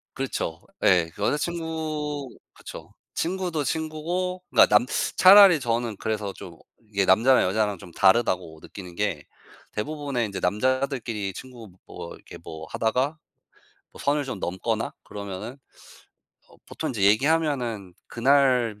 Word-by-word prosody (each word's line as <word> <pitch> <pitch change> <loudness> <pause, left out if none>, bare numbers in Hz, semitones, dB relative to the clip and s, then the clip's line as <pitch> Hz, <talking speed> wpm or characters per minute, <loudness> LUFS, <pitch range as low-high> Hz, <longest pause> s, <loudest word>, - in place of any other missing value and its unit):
그렇죠 130 -11 -3 0.2
예. 85 -2 +4
여자친구 155 -3 -2 0.2
그렇죠. - - -11 0.2
친구도 175 -3 -2
친구고 165 +5 -3
그러니까 110 -3 +6
남 120 - -1 0.3
차라리 190 -3 +9
저는 115 -3 -2
그래서 105 -2 -3
좀 85 -3 -11 0.3
이게 100 -1 +1
남자랑 115 +8 +5
여자랑 105 +1 0
좀 85 - -13
다르다고 95 -4 +2
느끼는 90 -3 -11
게 85 -7 -2 0.5
대부분의 140 0 -2
인제 100 - -5
남자들끼리 115 -1 -1
친구 120 -1 -11 0.2
뭐 85 - -9
이렇게 - - -13
뭐 80 0 -9
하다가 130 +7 0 0.8
어 - - -14
선을 145 0 0
좀 130 -6 -5
넘거나 90 +1 -2
그러면은 100 +4 -7 0.9
어 - - -20
보통 - - -5
인제 110 -6 -3
얘기하면은 120 - +1
그날 125 -4 +2
120 Hz, 295 characters per minute, -25 LUFS, 100-150 Hz, 0.9 s, 차라리